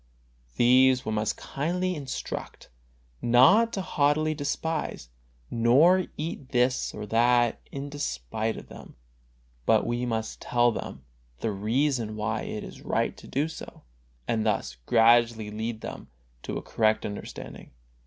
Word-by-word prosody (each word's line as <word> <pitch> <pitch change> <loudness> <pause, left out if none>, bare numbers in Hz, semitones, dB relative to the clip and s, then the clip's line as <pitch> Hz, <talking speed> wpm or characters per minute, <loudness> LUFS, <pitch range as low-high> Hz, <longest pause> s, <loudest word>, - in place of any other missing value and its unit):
These 130 +1 +5
we 110 - -2
must 105 0 -1
kindly 180 +6 -2
instruct, 140 -6 -6 0.5
and 120 - -2
not 205 - +6
haughtily 155 -4 +1
despise, 150 - -3 0.4
nor 145 +11 +4
eat 150 -3 -5
this 125 0 +1
or - - -6
that 120 +2 +3
in 140 +1 -5
despite 110 - -3
of - - -10
them, - - -12 0.7
but - - +4
we 120 +1 -1
must 110 -1 -3
tell 120 0 +3
them 65 - -7 0.4
the 110 - 0
reason 115 +2 0
why 110 +1 -2
it 105 - -5
is - - -10
right - - -1
to - - -13
do 145 +4 0
so, 160 - -10 0.4
and 110 -1 0
thus 105 - -1
gradually 115 -1 +4
lead 110 +1 -4
them - - -7 0.3
to - - -4
a - - -6
correct 110 -1 +1
understanding. 105 -1 -8
120 Hz, 135 wpm, -27 LUFS, 110-145 Hz, 0.7 s, not